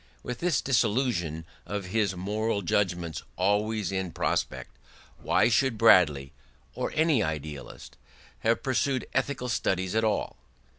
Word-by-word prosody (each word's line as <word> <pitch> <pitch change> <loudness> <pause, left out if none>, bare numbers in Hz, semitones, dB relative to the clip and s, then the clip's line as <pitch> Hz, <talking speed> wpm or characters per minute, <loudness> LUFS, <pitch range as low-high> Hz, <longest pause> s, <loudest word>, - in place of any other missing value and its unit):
With 125 - -5
this 170 -7 +1
dissolution 105 - 0 0.2
of 100 -2 -4
his 105 -4 +1
moral 105 +3 -1
judgments 85 -2 -1
always 105 +1 0
in 95 -2 -2
prospect, - - -2 0.5
why - - +3
should 120 0 +2
Bradley, 75 -11 +5 0.4
or - - -3
any 155 -5 +3
idealist, 75 -4 -6 0.4
have 115 - +1
pursued 130 0 0
ethical 135 -3 -1
studies 95 -5 -1
at 110 0 +1
all? 110 - -1
105 Hz, 120 wpm, -27 LUFS, 90-120 Hz, 0.5 s, Bradley